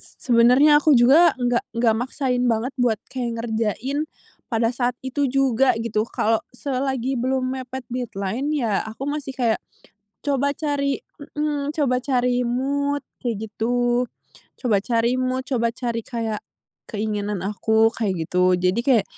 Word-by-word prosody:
se - - -16 0.2
sebenarnya 260 +6 +6
aku 295 -3 +5
juga 280 +6 +6
nggak 245 -1 -1
nggak 230 -2 +3
maksain 255 0 -1
banget 230 +4 -1
buat 235 -3 +3 0.2
kayak 245 -2 -2
ngerjain 235 +6 -2 0.4
pada 230 0 +1
saat 245 0 0
itu 275 +2 0
juga 265 -1 +3
gitu, 220 -1 -1
kalau 225 +1 +1 0.2
selagi 265 -1 -2
belum 255 +1 0
mepet 255 0 -6
deadline 245 +3 -2
ya 225 -7 0
aku 220 +4 -8
masih 285 -2 -4
kayak 235 -4 +1 0.6
coba 280 -1 +1
cari 285 -2 -1 0.4
mhm, 295 -1 -1
coba 280 -5 +1
cari 250 -2 +1
mood 280 +4 0 0.2
kayak 220 -3 -2
gitu, 240 +3 +1 0.6
coba 230 -6 +2
cari 235 +1 +1
mood, 255 0 -1
coba 235 -3 +1
cari 235 -2 -3
kayak 225 -3 -3 0.5
keinginan 210 -2 -2
aku, 220 +2 +3
kayak 190 -7 -1
gitu. 180 +1 +3
Jadi 185 +5 +1
kayak 240 -7 +4
245 Hz, 140 wpm, -23 LUFS, 225-270 Hz, 0.6 s, sebenarnya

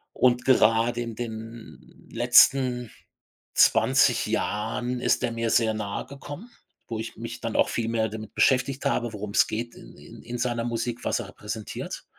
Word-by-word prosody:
Und 125 -1 +2
gerade 115 -1 +3
in 115 -2 -5
den 115 -1 -9
letzten 125 0 +4 0.6
20 - - +4
Jahren 120 +4 -2
ist - - +1
der 120 -2 0
mir 115 0 -2
sehr 110 -1 +3
nahegekommen, 140 - -6 0.4
wo 115 - -4
ich 110 +1 -6
mich - - -7
dann - - -4
auch - - +3
viel 115 -1 -2
mehr 110 -1 0
damit 110 -1 -8
beschäftigt 135 +1 +2
habe, 120 -4 0
worum's 105 -1 +1
geht 120 +2 -4
in - - -14
in - - -14
in 120 +1 -6
seiner 120 -2 -1
Musik, 120 0 -3
was - - 0
er 100 - -7
repräsentiert. 105 +1 -7
115 Hz, 160 wpm, -26 LUFS, 110-125 Hz, 0.6 s, letzten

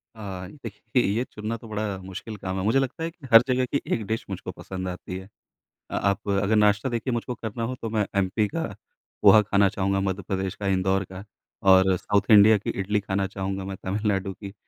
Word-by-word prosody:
अ, 95 -4 -6 0.2
देखिए, 115 +3 -1
ये 105 +5 +1
चुनना 110 +2 -4
तो 115 - -13
बड़ा 105 -2 -3
मुश्किल 95 +4 -7
काम 95 -1 -4
है। - - -2
मुझे 110 +6 +3
लगता 135 +4 -3
है 165 - -1
कि 160 -5 -13
हर 115 - +11
जगह 130 0 +2
की 140 +3 -1
एक 110 - -1
डिश 110 +2 -3
मुझको - - -5
पसंद 95 -1 -6
आती 90 0 -6
है। 95 - -9 0.6
अ, - - -4
आप 100 0 0
अगर 100 +2 +2
नाश्ता 105 +3 +3
देखिए 120 +1 -2
मुझको 120 +1 -3
करना 115 0 -5
हो 125 +3 -2
तो 115 - -3
मैं 110 -2 +1
एमपी 100 +2 +1
का - - -3 0.6
पोहा 110 - +8
खाना 100 -1 +3
चाहूँगा, 95 +1 0
मध्य 95 0 -1
प्रदेश 95 0 -2
का 100 - -4
इंदौर 95 0 +1
का 95 +1 -8 0.5
और 95 0 +6
साउथ 100 +3 +1
इंडिया 105 +1 +8
की 100 - -5
इडली 100 +2 0
खाना 95 -1 -1
चाहूँगा 95 0 -4
मैं 95 0 -5
तमिलनाडु 95 0 -1
की 100 +1 -9
100 Hz, 215 wpm, -25 LUFS, 95-110 Hz, 0.6 s, हर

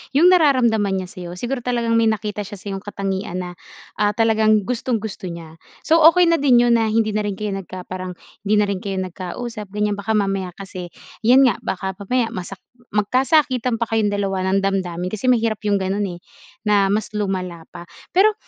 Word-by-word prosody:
yung 335 +5 +6
nararamdaman 235 - +3
niya 185 - -5
sa'yo. 175 -1 -8
Siguro 250 +1 -2
talagang 235 -2 0
may 230 0 +4
nakita 210 -1 -3
siya 205 +1 -8
sayong 195 -2 -6
katangian 195 -2 -3
na, 180 - -6 0.5
ah, 205 0 +3
talagang 220 -2 +3
gustong-gusto 225 -6 -3
niya. 165 -1 -9 0.3
So 330 +1 +4
okey 360 -1 +4
na 335 - +4
din 255 -4 +5
yun 240 -1 +4
na 225 -1 +2
hindi 220 -1 +2
na 210 - +1
rin 205 -1 -2
kayo 210 -1 -2
nagka 185 -1 -7
parang 185 -1 -6 0.3
hindi 210 +1 +2
na 210 - +3
rin 200 -2 -2
kayo 195 -2 -3
nagkausap, 195 +4 -6
ganyan. 210 0 0
Baka 200 +2 -3
mamaya 195 -3 0
kasi 185 -2 -8 0.4
'yan 255 +3 +6
nga, 225 - +2
baka 190 +1 -3
mamaya 230 +4 0
masak 185 -2 -7 0.3
magkasakitan 255 +2 +2
pa 230 - 0
kayong 220 -2 +2
dalawa 195 -2 -1
ng 195 - +3
damdamin 180 -3 -1
kasi 215 +4 -3
mahirap 230 -3 +2
yung 205 -1 +3
ganun, 195 +2 -1
eh, 175 -1 -7 0.5
na 200 -2 +3
mas 215 +1 -1
lumala 185 -5 -3
pa. 170 - -10 0.2
Pero 415 +4 +4
210 Hz, 190 wpm, -21 LUFS, 190-230 Hz, 0.5 s, yung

